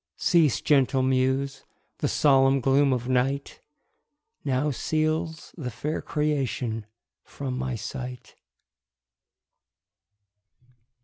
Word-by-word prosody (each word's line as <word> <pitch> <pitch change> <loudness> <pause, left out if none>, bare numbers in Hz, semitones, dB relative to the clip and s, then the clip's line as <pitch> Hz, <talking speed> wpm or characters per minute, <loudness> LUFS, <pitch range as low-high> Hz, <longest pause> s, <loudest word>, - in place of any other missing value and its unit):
Cease, 165 -6 +3
gentle 135 -2 +3
muse! 130 +1 0 0.4
the - - 0
solemn 135 -1 +4
gloom 135 +2 +3
of 125 -1 -1
night 130 +2 -1 0.8
Now 140 +2 0
seals 155 +2 -2
the 140 -7 -5
fair 150 +7 -3
creation 130 -7 -2 0.4
from 135 -3 -5
my 130 -1 -2
sight. 125 +2 -7
135 Hz, 85 wpm, -26 LUFS, 130-145 Hz, 0.8 s, solemn